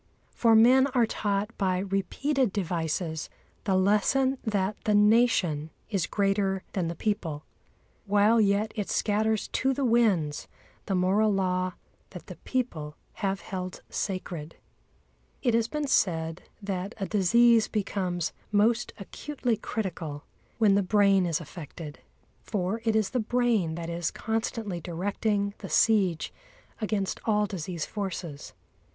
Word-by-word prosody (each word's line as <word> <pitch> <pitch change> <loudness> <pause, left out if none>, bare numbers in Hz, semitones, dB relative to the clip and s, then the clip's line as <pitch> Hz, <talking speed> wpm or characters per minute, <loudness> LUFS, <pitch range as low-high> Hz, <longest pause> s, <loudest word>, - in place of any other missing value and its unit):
For 230 -2 +4
men 255 +4 +6
are 240 -2 +5
taught 205 0 -2
by 185 -2 +1
repeated 200 +7 0
devices 165 -3 -2 0.4
the 195 - +2
lesson 235 +8 +2
that 205 -2 0
the 210 - +3
Nation 205 -8 +3 0.2
is 195 -5 0
greater 195 -1 0
than 180 -4 -1
the 170 - -4
people, 165 -9 -2 0.6
while 210 +3 +4
yet 205 +1 +2
it 205 -3 -3
scatters 215 0 +1
to 265 0 0
the 275 - 0
winds 205 -11 +2 0.4
the 195 - 0
moral 195 +4 +3
law 185 -1 0 0.4
that - - -10
the - - -10
people 160 - -3 0.3
have 195 -1 -1
held 185 -2 -6
sacred. 175 -5 -4 0.9
It 240 -4 +2
has 230 0 +2
been 300 +3 -2
said 165 - 0
that 195 +1 -3
a 195 - -2
disease 225 +3 +4
becomes 185 -5 -2 0.2
most 220 +3 +2
acutely 245 +4 -3
critical 170 -9 -4 0.3
when 215 -3 +4
the 200 - +4
brain 195 -1 +3
is 165 -3 0
affected. 155 -1 -9 0.4
For 205 +1 -2
it 225 -1 +2
is 215 -3 +1
the 250 - 0
brain 225 -7 +1
that 170 0 -5
is 170 0 -2
constantly 220 -4 -3
directing 200 +4 -1
the - - -7
siege 195 -7 +2 0.5
against 210 -3 -1
all 210 -1 +2
disease 180 -4 -4
forces. 180 -7 -5
200 Hz, 135 wpm, -28 LUFS, 180-220 Hz, 0.9 s, men